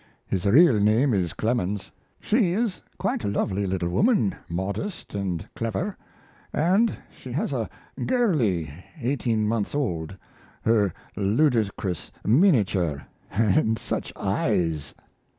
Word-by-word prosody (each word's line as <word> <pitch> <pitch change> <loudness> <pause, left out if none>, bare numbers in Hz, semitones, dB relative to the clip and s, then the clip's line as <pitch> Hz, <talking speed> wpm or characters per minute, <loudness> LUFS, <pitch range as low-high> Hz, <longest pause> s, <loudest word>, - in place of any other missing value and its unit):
His 95 0 -1
real 130 - +6
name 110 +6 +3
is 90 -4 0
Clemens. 105 -4 -1 0.3
She 210 -6 +2
is 215 -2 -1
a - - -34
quite - - -1
lovely 100 -1 0
little 90 -2 -1
woman, 185 - +3 0.2
modest 100 - -4
and 95 -3 -3
clever, 115 - -2 0.6
and 190 +9 +2 0.2
she - - -9
has - - -1
a - - -2 0.4
girlie 120 - +1 0.3
eighteen 120 -4 0
months 110 +3 -1
old, 95 - -2 0.5
her 105 -4 +3 0.2
ludicrous 105 - 0
miniature 105 - +3 0.3
and 110 +2 +2
such - - -3
eyes! 80 -5 0
110 Hz, 115 wpm, -25 LUFS, 95-145 Hz, 0.6 s, real